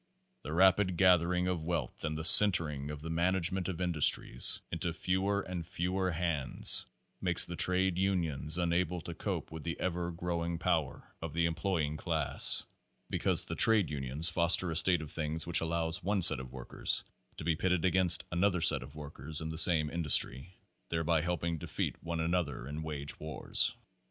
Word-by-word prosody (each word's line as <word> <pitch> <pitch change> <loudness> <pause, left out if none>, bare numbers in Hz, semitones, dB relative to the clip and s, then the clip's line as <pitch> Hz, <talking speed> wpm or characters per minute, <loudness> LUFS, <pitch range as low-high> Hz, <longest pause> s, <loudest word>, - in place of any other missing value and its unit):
"The - - -9
rapid 95 +1 +1
gathering 90 0 +1
of 90 -3 -3
wealth 80 -6 -5
and 75 -1 -4
the 80 - -6
centering 80 -7 +8
of 75 -1 -8
the 80 - -7
management 90 +2 -2
of 90 -3 -6
industries 80 -7 +2
into 85 +1 -3
fewer 95 +4 -2
and 90 -3 -7
fewer 90 +3 -4
hands 85 -4 0 0.3
make 90 -2 -3
the 85 - +2
trade 90 0 -1
unions 85 -5 -2
unable 90 0 -2
to - - -8
cope - - -6
with 80 -1 -9
the 85 +1 -7
ever 85 -1 -4
growing 85 0 -5
power 80 -5 -4
of 80 -2 -7
the 85 0 0
employing 85 -3 -3
class, 80 -2 +4 0.5
because - - +1
the - - -6
trade 110 -7 +2
unions 70 +3 -2
foster 85 +1 +2
a - - -5
state 85 0 +3
of 75 - -12
things 80 0 -4
which 85 - 0
allows 80 +2 -3
one 100 -1 -2
set - - +6
of 65 -1 -10
workers 65 -2 -2 0.3
to - - -8
be 85 0 -1
pitted 90 0 -2
against 90 -1 +2
another 90 +1 0
set - - +3
of 70 - -13
work 75 -3 -11
ers 75 +4 -3
in 80 -1 -6
the 80 - -7
same 80 -3 +7
industry, 80 0 0 0.3
thereby 80 -1 -1
helping 85 -1 -4
defeat - - -5
one 85 0 -6
another 80 -6 -3
in 75 +2 -7
wage 75 -2 -6
wars. 80 -2 -1
85 Hz, 175 wpm, -30 LUFS, 80-90 Hz, 0.5 s, centering